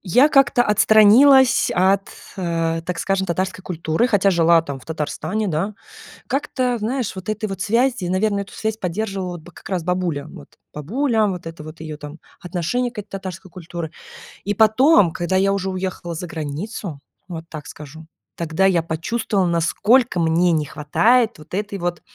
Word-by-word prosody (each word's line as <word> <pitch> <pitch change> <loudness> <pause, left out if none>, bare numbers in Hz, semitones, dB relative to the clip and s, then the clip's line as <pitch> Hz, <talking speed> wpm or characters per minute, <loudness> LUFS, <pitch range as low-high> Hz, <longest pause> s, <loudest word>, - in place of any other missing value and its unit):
я 250 - +4
как-то 275 -5 +4
отстранилась 240 +6 +5
от, 190 +2 +2 0.3
э, 165 -2 -1
так 180 -2 -3
скажем, 195 -1 0
татарской 185 +1 -2
культуры, 165 +5 0
хотя 200 -4 +3
жила 170 -1 +4
там 140 -4 -6
в - - -17
Татарстане, 180 +7 -3
да. 180 +6 -2 0.5
Как-то, 255 -4 -1
знаешь, 235 -1 -2
вот 190 +2 -7
этой 215 0 -2
вот 195 -1 -6
связи, 235 -1 +1
наверно, 200 +2 +1
эту 200 - -7
связь 220 0 -3
поддерживала 190 -2 -3
бы, 165 +2 -14
как - - -13
раз, 185 -3 -2
бабуля. 175 -5 -2
Вот - - -12 0.3
бабуля, 220 - 0
вот 180 -3 -4
это 165 -1 -8
вот 155 +1 -11
ее 155 -2 -7
там 150 +1 -9 0.2
отношение 185 +8 -2
к 240 - -19
этой 205 0 -7
татарской 190 -1 -7
культуры. 170 -2 -7 0.5
И 205 - -1
потом, 220 - +5
когда 175 +3 -1
я 195 +1 +3
уже 195 -1 -1
уехала 185 -2 -4
за 170 +2 -6
границу, 160 +2 -5 0.3
вот 165 -3 -7
так 155 -2 -8
скажу. 155 +2 -11 0.3
Тогда 170 +3 0
я 180 -3 +3
почувствовала, 190 +5 -1
насколько 180 +6 +2
мне 170 +2 +2
не 155 -2 +1
хватает 220 - +2
вот 155 - -16
этой 205 +1 -3
вот 175 -2 -3
185 Hz, 170 wpm, -21 LUFS, 165-215 Hz, 0.5 s, отстранилась